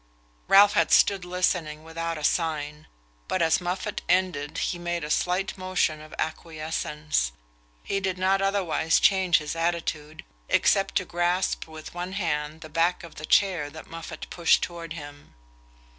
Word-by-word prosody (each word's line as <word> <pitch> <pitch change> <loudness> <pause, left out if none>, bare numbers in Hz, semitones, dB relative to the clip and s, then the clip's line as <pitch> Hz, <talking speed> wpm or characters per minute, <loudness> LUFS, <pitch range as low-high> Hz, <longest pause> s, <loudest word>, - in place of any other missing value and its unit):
Ralph 200 +1 +7
had 165 - +2
stood 195 -2 +5
listening 175 -4 -1
without 165 0 -4
a 155 - -7
sign, 150 -2 -1 0.4
but - - 0
as 165 +1 +3
Moffatt 185 +4 -3
ended 180 -6 +1
he 175 - -1
made 175 -1 -3
a 150 - -4
slight 180 +4 0
motion 185 -4 0
of 155 0 -13
acquiescence. 155 - -2 0.5
He 195 - -1
did 190 -2 -2
not 190 +1 +2
otherwise 185 -5 +2
change 190 -3 +4
his 150 +1 -4
attitude, 160 -2 -2 0.2
except 195 0 +3
to 185 - +1
grasp 175 +1 0
with 155 -1 -10
one 180 +2 -5
hand 160 -4 -2
the 160 - -8
back 165 +3 +1
of 170 - -10
the 155 - -6
chair 180 -7 +3
that 160 +2 -12
Moffatt 165 -2 -7
pushed 170 -2 +3
toward 170 -1 -5
him. 145 - -11
165 Hz, 155 wpm, -26 LUFS, 155-185 Hz, 0.5 s, Ralph